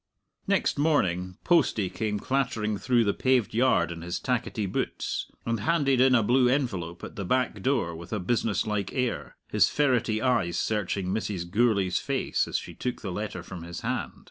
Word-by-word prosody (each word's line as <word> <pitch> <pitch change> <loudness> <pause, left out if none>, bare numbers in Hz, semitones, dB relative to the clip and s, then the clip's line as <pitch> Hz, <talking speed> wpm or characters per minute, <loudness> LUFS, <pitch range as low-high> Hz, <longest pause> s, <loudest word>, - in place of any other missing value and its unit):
Next - - +1
morning 95 - +1
Postie 145 - +3
came 105 +2 -2
clattering 115 -4 0
through 120 +4 +3
the 100 -2 +1
paved 130 -4 +1
yard 115 -8 +3
in 85 -1 -7
his 85 +1 -3
tackety 125 -4 -1
boots, 95 - -3 0.2
and 115 -1 0
handed 135 +1 +2
in 130 0 +6
a 115 - +4
blue 125 +3 +4
envelope 95 - -1
at - - -7
the 100 - -4
back 125 0 0
door 120 -9 0
with 85 +1 -10
a 105 - -1
business 105 +1 0
like 105 -3 -2
air, 125 -2 -2
his 105 -1 +4
ferrety 125 -6 +1
eyes 110 -9 +1
searching 100 -3 -1
Mrs. 95 -3 -2
Gourlay's 100 -2 +2
face - - -1
as - - -1
she - - -7
took 125 -1 -4
the 95 - -3
letter 95 -2 -4
from 90 -1 -8
his 85 +1 -7
hand. - - -2
110 Hz, 180 wpm, -27 LUFS, 95-125 Hz, 0.2 s, in